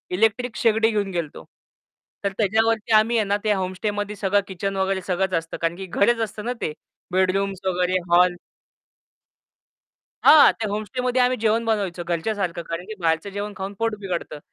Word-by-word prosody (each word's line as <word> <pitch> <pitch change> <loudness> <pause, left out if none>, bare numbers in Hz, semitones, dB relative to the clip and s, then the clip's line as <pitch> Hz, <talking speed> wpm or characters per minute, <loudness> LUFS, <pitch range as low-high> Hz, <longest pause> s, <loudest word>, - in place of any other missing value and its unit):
Electric 225 +3 +1
शेगडी 225 0 +3
घेऊन 205 -2 -1
गेलतो. 170 -5 -4 0.8
तर 200 - 0
त्याच्यावरती 220 +1 +1
आम्ही 220 +2 +4
आहे 215 - +2
ना, 200 +1 +1
ते 215 - +2
होमस्टेमध्ये 205 +2 -3
सगळं 200 0 +1
किचन 195 +1 -4
वगैरे 190 0 0
सगळंच 190 0 0
असतं, 165 0 -2
कारण 165 0 -1
की 190 - -6
घरच 230 +6 +2
असतं 210 +1 -6
ना 245 - -1
ते. 150 - -2 0.4
बेडरूम्स 190 +1 +1
वगैरे, 180 0 +1
हॉल 175 +1 +5 1.9
हां, 305 -1 +8
ते 220 -2 -4
होमस्टेमध्ये 250 +5 -1
आम्ही 250 +1 +2
जेवण 225 +1 +2
बनवायचं 195 -6 -1
घरच्यासारखं, 175 0 -2
कारण 165 +2 -5
की 220 - -7
बाहेरचं 165 +3 0
जेवण 205 +1 -5
खाऊन 195 +1 -5
पोट 225 -1 0
बिघडतं. 175 -6 -4
200 Hz, 160 wpm, -23 LUFS, 185-220 Hz, 1.9 s, हां